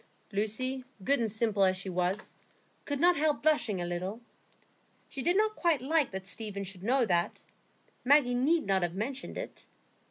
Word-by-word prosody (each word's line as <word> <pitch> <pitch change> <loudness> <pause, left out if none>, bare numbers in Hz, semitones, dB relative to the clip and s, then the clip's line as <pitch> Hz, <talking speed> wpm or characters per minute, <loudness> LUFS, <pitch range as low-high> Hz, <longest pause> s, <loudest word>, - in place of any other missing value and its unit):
Lucy, 255 +6 -1 0.2
good 280 +6 +2
and 225 -3 0
simple 220 -2 +1
as 185 -1 +3
she 195 - -8
was, 180 +2 -2 0.5
could 285 -1 -2
not 350 +3 +5
help 300 -1 +1
blushing 245 -11 +2
a 175 - -2
little. 180 +5 -3 0.9
She 270 - -6
did 350 +7 +2
not 430 0 +2
quite 335 -5 +2
like 295 +2 +1
that 190 -1 -6
Stephen 200 0 -3
should 190 -1 -9
know 250 +5 +2
that; 175 -4 0 0.6
Maggie 270 -2 +5
need 285 +6 +2
not 195 -1 +2
have 175 0 -1
mentioned 255 +7 -4
it. - - -8
230 Hz, 170 wpm, -30 LUFS, 195-285 Hz, 0.9 s, not